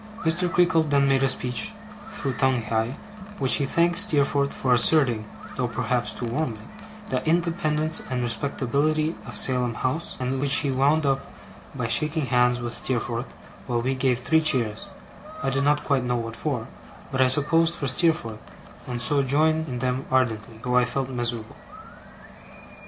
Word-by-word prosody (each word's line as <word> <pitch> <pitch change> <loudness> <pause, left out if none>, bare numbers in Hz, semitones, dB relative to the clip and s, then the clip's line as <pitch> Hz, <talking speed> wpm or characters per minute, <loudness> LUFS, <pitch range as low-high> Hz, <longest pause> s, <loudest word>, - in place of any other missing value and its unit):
Mr. 170 +2 +1
Creakle 175 -2 +3
then 140 -3 +2
made 135 -1 +2
a 135 - +3
speech, 125 - -1 0.4
through 135 -9 -4
Tungay, 115 -4 0
in 130 - -7 0.4
which 130 -2 +4
he 140 - -1
thanked 175 +4 +2
Steerforth 140 -7 +3
for 130 -2 0
asserting 120 -3 +3 0.3
(though 125 -2 0
perhaps 120 +1 -2
too 120 - -6
warmly) 115 -3 -3 0.5
the - - -1
independence 160 -2 0
and 125 -1 -2
respectability 140 +6 0
of - - -6
Salem 125 -3 +3
House; 155 +9 -3
and 130 +1 -2
which 140 -1 +3
he 140 -2 +2
wound 145 +4 +2
up 135 -1 -1 0.4
by 125 -3 -3
shaking 150 +7 0
hands 125 -1 +2
with 120 -1 -5
Steerforth, 120 0 -3 0.4
while 120 -2 -1
we 130 +2 0
gave 130 -2 0
three 160 +4 +2
cheers 130 - +1 0.5
I 135 - 0
did 135 +1 0
not 150 +1 +2
quite 140 -3 +1
know 125 0 -1
what 115 -1 -5
for, 125 -3 -3 0.4
but 130 - 0
I 130 - +5
supposed 165 +5 +2
for 145 - -4
Steerforth, 130 -7 0 0.5
and 125 -1 -4
so 140 +3 +1
joined 155 +4 +1
in 125 -3 -4
them 125 +2 -2
ardently, 115 -4 -1
though 125 0 +1
I 125 - +5
felt 130 +1 -3
miserable. 120 -3 -3
130 Hz, 165 wpm, -24 LUFS, 120-150 Hz, 0.5 s, I